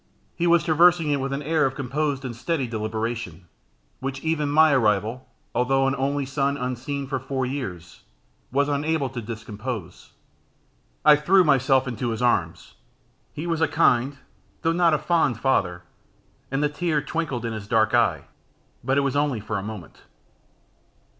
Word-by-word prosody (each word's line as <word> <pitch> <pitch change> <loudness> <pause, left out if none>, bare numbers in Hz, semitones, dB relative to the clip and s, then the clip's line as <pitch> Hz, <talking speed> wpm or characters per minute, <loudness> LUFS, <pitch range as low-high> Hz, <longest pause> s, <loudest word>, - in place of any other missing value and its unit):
He 175 - 0
was 170 -2 +4
traversing 170 -1 +4
it 140 - +1
with 135 0 -3
an 140 +2 -3
air 155 +1 +1
of 135 - -5
composed 140 +1 -2
and 120 -2 -5
steady 140 +3 -1
deliberation, 110 -5 -4 0.5
which 135 0 -4
even 160 -2 0
my 155 +1 +5
arrival, 110 0 +1 0.2
although 135 +3 +2
an 135 - +1
only 140 +1 -1
son 140 +1 -1
unseen 130 +3 -3
for 135 0 -3
four 130 0 -3
years, 100 - -6 0.5
was 140 +2 +2
unable 145 0 0
to 125 -2 -6
discompose. 110 -3 -7 0.9
I 150 -1 +9
threw 180 +6 +4
myself 135 -3 +3
into 120 0 -3
his 115 - -3
arms. 100 -9 0 0.6
He 155 - -6
was 165 -2 -1
a 160 - +4
kind, 140 -3 +2 0.5
though 165 - +3
not 170 -2 +3
a - - +1
fond 150 -7 +1
father, 90 -10 0 0.7
and 135 +2 -1
the 150 - +2
tear 150 -1 -1
twinkled 150 -7 -3
in 115 - -3
his 105 -2 -7
dark 110 -1 +2
eye, 115 -11 +2 0.6
but 135 +1 +1
it - - +4
was 140 -1 -1
only 145 -5 +1
for 105 0 -3
a - - -5
moment. 105 -5 -9
135 Hz, 165 wpm, -24 LUFS, 115-150 Hz, 0.9 s, I